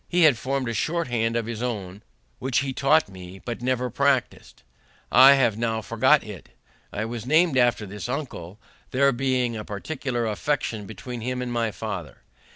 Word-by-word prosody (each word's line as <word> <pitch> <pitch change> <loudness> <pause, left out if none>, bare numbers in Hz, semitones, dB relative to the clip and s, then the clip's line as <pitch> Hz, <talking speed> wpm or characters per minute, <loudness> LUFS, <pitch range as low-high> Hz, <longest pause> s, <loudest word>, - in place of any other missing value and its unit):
He 175 0 +3
had 150 -5 +6
formed 130 +2 -2
a 115 - -2
short 165 - -1
hand 115 -1 0
of 115 -1 0
his 115 -1 -5
own, 105 -6 -4 0.4
which 130 0 0
he 135 -1 -3
taught 145 +3 +3
me, 95 -1 -11
but, 120 +4 -6
never 125 0 -1
practising 140 0 0
it, - - -26 0.5
I 130 +3 +9
have 120 -5 +1
now 115 -1 -1
forgot 130 +7 +3
it. 105 -5 -10 0.4
I 110 - -3
was 115 0 -6
named 160 +1 +4
after 120 -4 +2
this 105 +4 -7
uncle, 115 - -5 0.3
there 140 +2 +3
being 125 -2 0
a 105 - -5
particular 120 +3 -3
affection 110 -2 -2
between 115 +3 -7
him 125 +2 -3
and 125 -1 -3
my 115 -1 0
father. 100 - -6
120 Hz, 180 wpm, -25 LUFS, 110-135 Hz, 0.5 s, I